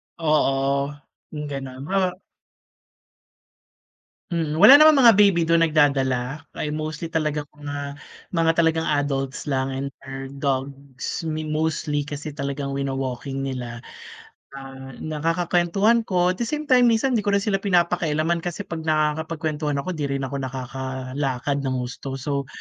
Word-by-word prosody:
Oo, 140 Hz, -3 st, +1 dB, 0.4 s
hmm, 150 Hz, -1 st, -5 dB
ganun, 135 Hz, -1 st, -6 dB
huh 185 Hz, -2 st, +1 dB, 2.1 s
Hmm, 160 Hz, -2 st, -1 dB
wala 270 Hz, -, +10 dB
naman 305 Hz, -1 st, +7 dB
mga 235 Hz, -4 st, +8 dB
baby 190 Hz, -5 st, +4 dB
dun 165 Hz, 0 st, +4 dB
nagdadala? 140 Hz, -3 st, +1 dB
Ay, -, -, -4 dB
mostly 155 Hz, +2 st, -4 dB
talagang 155 Hz, -2 st, -1 dB
mga 145 Hz, -1 st, -6 dB, 0.4 s
mga 165 Hz, 0 st, +4 dB
talagang 165 Hz, -1 st, +3 dB
adults 140 Hz, -2 st, -1 dB
lang 135 Hz, -1 st, 0 dB
and 135 Hz, +1 st, -3 dB, 0.2 s
their 135 Hz, 0 st, -6 dB
dogs. 140 Hz, 0 st, -4 dB
Mi 155 Hz, -1 st, -3 dB
mostly 155 Hz, -1 st, -1 dB
kasi 145 Hz, 0 st, -7 dB
talagang 140 Hz, -1 st, -3 dB
wino-walking 135 Hz, 0 st, -3 dB
nila. 125 Hz, -3 st, -5 dB, 0.8 s
Ah, 135 Hz, -1 st, -9 dB
nakakakwentuhan 175 Hz, +8 st, +1 dB
ko 180 Hz, -1 st, +2 dB
at 185 Hz, -, -3 dB
the 235 Hz, -, -1 dB
same 300 Hz, +4 st, -3 dB
time 250 Hz, -1 st, +6 dB
minsan 235 Hz, +2 st, +2 dB
di 210 Hz, -, -4 dB
ko 200 Hz, -, +2 dB
rin 200 Hz, -, +2 dB
sila 200 Hz, -2 st, +1 dB
pinapakialaman 170 Hz, -3 st, +1 dB
kasi 175 Hz, +3 st, -4 dB
pag 165 Hz, -4 st, -7 dB
nakakapagkwentuhan 155 Hz, -1 st, 0 dB
ako 185 Hz, -, -4 dB
di 150 Hz, -, -1 dB
rin 140 Hz, 0 st, -2 dB
ako 140 Hz, +1 st, -3 dB
nakakalakad 130 Hz, +1 st, -3 dB
ng 135 Hz, -2 st, -2 dB
husto. 125 Hz, +2 st, -6 dB
So, 140 Hz, +1 st, -3 dB
150 Hz, 140 wpm, -23 LUFS, 135-165 Hz, 2.1 s, wala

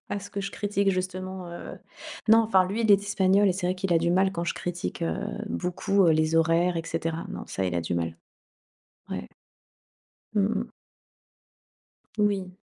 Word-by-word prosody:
à 205 Hz, -, -2 dB
ce 200 Hz, -, -10 dB
que 200 Hz, -, -3 dB
je 195 Hz, 0 st, -4 dB
critique 200 Hz, -1 st, 0 dB
justement, 185 Hz, 0 st, -4 dB
heu 170 Hz, -, -8 dB, 0.5 s
non, 220 Hz, +1 st, +8 dB
enfin, 190 Hz, -5 st, +3 dB
lui 200 Hz, +5 st, -2 dB
il 220 Hz, -, +2 dB
est 200 Hz, -, +6 dB
espagnol 200 Hz, 0 st, +3 dB
et -, -, +3 dB
c'est 180 Hz, 0 st, -2 dB
vrai 180 Hz, -, +1 dB
qu'il 185 Hz, -1 st, -1 dB
a 165 Hz, -, +5 dB
du 170 Hz, +1 st, +1 dB
mal 190 Hz, +2 st, +3 dB
quand 170 Hz, -1 st, -3 dB
je -, -, -1 dB
critique, 175 Hz, -1 st, -4 dB
heu, 165 Hz, -, 0 dB, 0.3 s
beaucoup, 195 Hz, +2 st, +1 dB
heu, -, -, +6 dB
les 155 Hz, +1 st, +2 dB
horaires 170 Hz, +2 st, +3 dB
et 165 Hz, -, -1 dB
cetera. 165 Hz, +2 st, -3 dB
Non 195 Hz, -, -6 dB
ça 95 Hz, -, -2 dB
il 90 Hz, -1 st, -1 dB
a 85 Hz, -, +1 dB
du 85 Hz, +1 st, -2 dB
mal. 85 Hz, -1 st, -2 dB, 0.9 s
Ouais. 65 Hz, -, -5 dB, 1.1 s
Mmh 205 Hz, -, +3 dB, 0.2 s
mh. 235 Hz, -, -5 dB, 1.5 s
Oui. 195 Hz, -3 st, 0 dB
185 Hz, 190 wpm, -27 LUFS, 165-200 Hz, 1.5 s, non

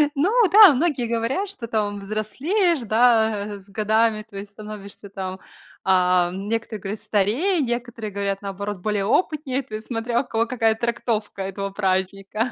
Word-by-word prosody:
Ну 335 Hz, +9 st, +2 dB, 0.2 s
да, 405 Hz, -4 st, +10 dB
многие 275 Hz, -4 st, 0 dB
говорят, 235 Hz, -, -1 dB
что 255 Hz, -13 st, -7 dB
там 205 Hz, -3 st, -1 dB
взрослеешь, 265 Hz, -, 0 dB
да, 220 Hz, -3 st, +2 dB
с 195 Hz, -, -21 dB
годами, 215 Hz, +1 st, +1 dB
то 200 Hz, -, -10 dB
есть 200 Hz, +1 st, -8 dB
становишься 205 Hz, -1 st, -10 dB
там, 190 Hz, -1 st, -6 dB, 0.4 s
ам, 185 Hz, 0 st, +2 dB
некоторые 225 Hz, -2 st, -3 dB
говорят, 205 Hz, +2 st, -5 dB
старее, 225 Hz, -, +1 dB
некоторые 240 Hz, -3 st, -3 dB
говорят, 200 Hz, 0 st, -2 dB
наоборот, 200 Hz, 0 st, -5 dB
более 205 Hz, +1 st, -1 dB
опытнее. 280 Hz, -, 0 dB
То 220 Hz, -4 st, -8 dB
есть, 215 Hz, 0 st, -7 dB
смотря 235 Hz, +1 st, -1 dB
у 270 Hz, -, -11 dB
кого 225 Hz, +1 st, +1 dB
какая 225 Hz, -3 st, +1 dB
трактовка 225 Hz, -3 st, -2 dB
этого 195 Hz, +1 st, -4 dB
праздника. 195 Hz, +4 st, -1 dB
215 Hz, 155 wpm, -23 LUFS, 200-240 Hz, 0.4 s, да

